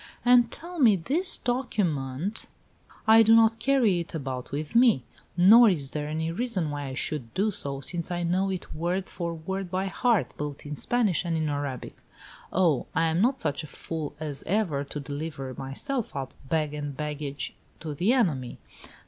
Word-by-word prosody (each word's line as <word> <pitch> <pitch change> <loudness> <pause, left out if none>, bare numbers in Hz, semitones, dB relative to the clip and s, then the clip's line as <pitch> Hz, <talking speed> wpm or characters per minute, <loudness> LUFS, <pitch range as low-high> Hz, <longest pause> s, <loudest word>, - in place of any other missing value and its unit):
"And 245 -1 +6
tell 345 +1 -8
me 230 -7 +6
this 295 - +1
document 190 - -2 0.3
" - - -27
"I 225 - +9
do 225 0 +6
not 225 0 +5
carry 235 -7 +3
it 170 -1 -6
about 130 -4 -5
with 150 +7 -4
me, 235 - +5 0.3
nor 220 +6 +8
is 145 -7 -2
there 150 -1 -3
any 160 +2 -2
reason 185 -6 -1
why 145 -1 -4
I 130 - -5
should 130 -5 -3
do 205 +3 +2
so, 140 -9 -3
since 170 +5 -3
I 175 -1 -2
know 185 +3 +1
it 185 -2 -5
word 175 +4 -2
for 170 -2 -3
word 190 +3 -4
by 185 +1 -1
heart, 220 +1 +1
both 145 -1 -5
in 145 - -5
Spanish 210 +1 +1
and 170 -2 -1
in 155 -1 0
Arabic. 145 -3 -4 0.6
Oh, 165 -7 +2
I 165 - +3
am 165 +3 +1
not 255 +4 +2
such 145 - -1
a - - -8
fool 155 -1 -6
as 150 -3 -5
ever 175 -7 0
to 150 - -6
deliver 140 -2 -5
myself 230 - -3
up, 135 -2 -4 0.2
bag 155 -2 0
and 145 -2 -5
baggage, 145 -1 -4 0.3
to 155 -2 -4
the 180 +10 +1
enemy! 160 - +1
165 Hz, 180 wpm, -27 LUFS, 145-215 Hz, 0.6 s, I